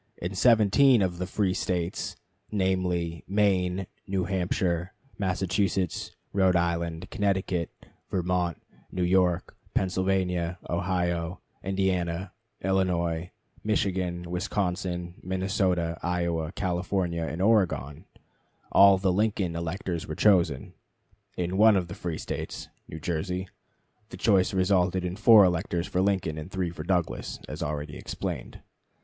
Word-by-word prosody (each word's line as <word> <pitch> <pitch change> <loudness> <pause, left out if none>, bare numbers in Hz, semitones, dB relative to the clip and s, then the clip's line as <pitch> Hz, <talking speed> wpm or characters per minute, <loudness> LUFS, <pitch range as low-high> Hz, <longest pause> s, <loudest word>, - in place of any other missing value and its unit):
In 90 +3 -4
seventeen 115 +3 +5
of 90 -2 -2
the 90 - -2
free 95 -2 0
States 90 -2 -2 0.4
namely, 90 -4 0
Maine, 95 -2 +1 0.2
New 95 -1 0
Hampshire, 90 -1 -1 0.3
Massachusetts, 95 -1 -1 0.2
Rhode 95 -2 +3
Island, 85 0 -1
Connecticut, 95 -5 0 0.4
Vermont, 90 -2 0 0.3
New 90 - -1
York, 90 -1 +2 0.2
Pennsylvania, 95 -2 0
Ohio, 85 -1 -1 0.2
Indiana, 95 -2 -1 0.3
Illinois, 90 -3 0 0.3
Michigan, 90 -4 -1
Wisconsin, 90 -1 -2
Minnesota, 90 -3 0
Iowa, 85 -2 -1
California, 90 -2 -1
and 80 - -5
Oregon 85 - +1 0.7
all 100 -1 +7
the 95 -1 +1
Lincoln 100 -4 0
electors 85 0 -3
were 80 - -4
chosen. 85 -10 +3 0.6
In 90 +1 -1
one 110 0 +7
of 90 -2 -1
the - - -5
free 85 -3 -4
States - - -5 0.2
(New 80 - -7
Jersey) 90 +3 -3 0.6
the - - -9
choice 95 -4 +3
resulted 95 -1 +2
in 90 0 -3
4 110 0 +8
electors 90 -1 +1
for 90 - 0
Lincoln 95 -5 0
and 75 - -7
3 95 -3 -2
for 85 - -8
Douglas, 90 -1 -1
as - - -6
already 75 0 -3
explained. - - -5
90 Hz, 120 wpm, -27 LUFS, 85-95 Hz, 0.7 s, 4